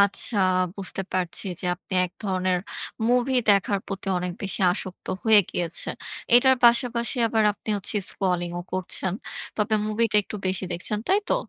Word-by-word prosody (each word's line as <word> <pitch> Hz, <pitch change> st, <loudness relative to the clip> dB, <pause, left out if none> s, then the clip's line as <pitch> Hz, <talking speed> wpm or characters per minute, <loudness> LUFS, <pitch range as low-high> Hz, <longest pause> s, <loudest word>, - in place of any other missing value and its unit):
আচ্ছা, 200 Hz, +2 st, +2 dB, 0.4 s
বুঝতে 195 Hz, 0 st, -3 dB
পারছি 180 Hz, 0 st, -1 dB, 0.2 s
যে, -, -, -6 dB
আপনি 190 Hz, +2 st, -14 dB
এক 180 Hz, -, -6 dB
ধরনের 185 Hz, -1 st, +1 dB, 0.5 s
মুভি 250 Hz, +2 st, +2 dB, 0.2 s
দেখার 200 Hz, 0 st, +3 dB
প্রতি 195 Hz, 0 st, -6 dB
অনেক 180 Hz, 0 st, -3 dB
বেশি 195 Hz, 0 st, -3 dB
আসক্ত 185 Hz, 0 st, -7 dB, 0.2 s
হয়ে 220 Hz, -2 st, +7 dB
গিয়েছেন। 175 Hz, -1 st, -3 dB, 0.4 s
এটার 260 Hz, +1 st, +6 dB
পাশাপাশি 235 Hz, +1 st, +3 dB
আবার 220 Hz, -1 st, +2 dB
আপনি 210 Hz, -, -17 dB
হচ্ছে 200 Hz, +2 st, -1 dB
স্ক্রলিং 180 Hz, -3 st, -1 dB
ও -, -, -7 dB
করছেন। 185 Hz, 0 st, -2 dB, 0.4 s
তবে 215 Hz, +1 st, +1 dB
মুভিটা 215 Hz, 0 st, +1 dB
একটু 210 Hz, -, -7 dB
বেশি 185 Hz, 0 st, -1 dB
দেখছেন, 190 Hz, +5 st, -2 dB
তাই 390 Hz, +2 st, +4 dB
তো? -, -, +3 dB
200 Hz, 155 wpm, -25 LUFS, 185-225 Hz, 0.5 s, হয়ে